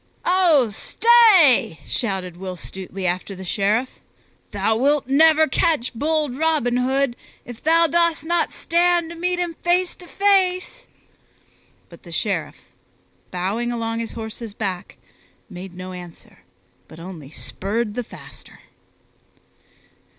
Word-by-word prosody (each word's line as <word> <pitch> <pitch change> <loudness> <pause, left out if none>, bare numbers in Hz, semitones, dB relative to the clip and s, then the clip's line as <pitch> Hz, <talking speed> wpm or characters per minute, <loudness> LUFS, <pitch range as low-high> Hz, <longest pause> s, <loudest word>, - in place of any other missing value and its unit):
"Oh 340 -9 +4
stay!" 370 - +5
shouted 190 -6 -2
Will 185 0 -6
Stutely 190 +1 -7
after 185 +2 -2
the 190 0 -9
Sheriff. 215 +7 -1 0.5
"Thou 220 - 0
wilt 280 +5 +2
never 315 +3 +5
catch 285 -4 +1
bold 300 +1 -1
Robin 295 -5 +1
Hood 260 0 0 0.3
if 240 -2 -10
thou 330 +2 +4
dost 335 -1 +1
not 340 +1 0
stand 345 0 +1
to - - -8
meet 360 +1 -1
him 350 -1 -2
face 350 +1 +1
to 355 - -14
face." 390 +4 +1 1.0
But - - -15
the - - -13
Sheriff, - - -2 0.7
bowing 200 +7 -2
along 230 -1 -3
his 230 - -5
horse's 220 -1 -7
back, 190 -5 -5 0.5
made 180 0 -9
no 185 +1 -8
answer 175 -2 -12 0.5
but 160 - -14
only 165 -5 -9
spurred 210 +7 -4
the 245 +2 -3
faster. - - -14
245 Hz, 125 wpm, -21 LUFS, -, 1.0 s, stay